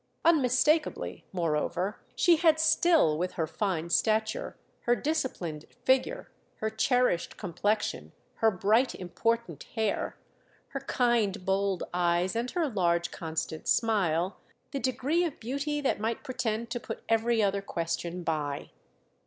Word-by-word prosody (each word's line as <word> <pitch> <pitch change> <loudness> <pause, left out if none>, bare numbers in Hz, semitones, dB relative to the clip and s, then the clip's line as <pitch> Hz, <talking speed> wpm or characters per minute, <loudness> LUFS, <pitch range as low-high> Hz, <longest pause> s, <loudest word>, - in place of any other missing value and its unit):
Unmistakably, 305 0 +2
moreover, 175 +3 -1 0.2
she 345 -2 +5
had 320 -1 +4
still, 320 - +4
with 180 +1 -1
her 165 -3 -1
fine 170 -1 -2
stature, 220 +4 +1 0.3
her 240 - +4
disciplined 240 - -2 0.2
figure, 265 - +1 0.2
her 220 0 -2
cherished 235 -4 +1
complexion, 205 +3 -1 0.3
her 225 - +4
bright 215 +6 +2
important 230 +6 -2
hair, 220 -3 -1 0.5
her - - -4
kind 220 -6 +1
bold 195 -1 +1
eyes 175 +2 +1
and 235 +2 -1
her 345 0 0
large 175 -7 +1
constant 160 -1 -4
smile, 190 -6 +1 0.3
the 280 - -2
degree 265 +7 +1
of 330 -5 -3
beauty 280 +5 -2
that 270 - 0
might 225 +2 -2
pretend 235 -4 -2
to 240 - -2
put 225 - -7
every 225 0 +2
other 200 0 +1
question 170 -1 -3
by. 150 -3 -2
220 Hz, 130 wpm, -29 LUFS, 180-255 Hz, 0.5 s, she